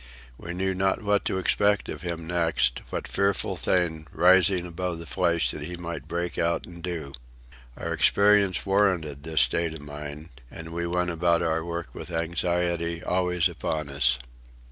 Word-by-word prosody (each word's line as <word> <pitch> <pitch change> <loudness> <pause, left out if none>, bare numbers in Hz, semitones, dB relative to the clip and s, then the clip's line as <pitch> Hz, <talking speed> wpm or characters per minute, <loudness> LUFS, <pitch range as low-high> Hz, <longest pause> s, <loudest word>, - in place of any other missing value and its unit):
We 85 +7 -7
knew 95 +1 0
not 95 +2 0
what 105 0 +1
to - - 0
expect 100 +2 +2
of - - -6
him 85 -2 -4
next, 85 -7 +1
what - - -4
fearful 100 0 0
thing, 80 -4 0
rising 90 0 +4
above 90 0 -3
the 85 - -8
flesh, 85 -8 +1
he 75 +4 -6
might 85 -1 -6
break 85 +1 -3
out 85 0 0
and 85 -1 -11
do. 80 -6 -5 0.6
Our - - -3
experience 100 -2 +4
warranted 95 -8 +1
this 80 -1 +2
state 80 +6 +2
of 75 - -9
mind, 75 +2 -8 0.2
and 80 +4 -9
we 85 0 -2
went 90 +1 0
about 85 0 +2
our 80 -1 0
work 85 0 -5
with - - -8
anxiety 85 0 -1
always 90 -1 +1
upon 80 -3 -3
us. 70 -2 +4
85 Hz, 165 wpm, -26 LUFS, 80-90 Hz, 0.6 s, rising